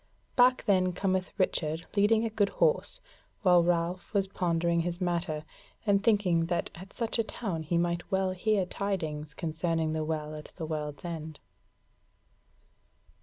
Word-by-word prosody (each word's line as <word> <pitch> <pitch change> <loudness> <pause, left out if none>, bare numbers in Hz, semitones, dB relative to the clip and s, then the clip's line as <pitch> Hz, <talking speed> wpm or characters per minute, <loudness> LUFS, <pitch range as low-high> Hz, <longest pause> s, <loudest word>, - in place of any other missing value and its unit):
Back 255 0 +5
then 185 -3 +3
cometh 185 0 0
Richard 160 -3 +1
leading 215 +2 +4
a 225 - -2
good 205 -2 +2
horse 480 0 +1 0.4
while 180 -3 +6
Ralph 175 +1 0
was 195 -1 +3
pondering 170 -3 0
his 175 +1 -2
matter, 170 -4 -1 0.4
and 200 -2 +3
thinking 185 -7 +3
that 175 0 -1
at 185 +4 -11
such 230 0 -2
a - - +4
town 195 -7 -4
he 160 +2 -1
might 170 0 -1
well 190 -1 +2
hear 195 +1 +1
tidings 160 -7 -3
concerning 160 -1 -1
the 160 0 -1
Well 155 -1 -3
at 150 0 -8
the 165 - -4
World's 150 0 -4
End. 160 -3 -6
175 Hz, 150 wpm, -29 LUFS, 160-195 Hz, 0.4 s, while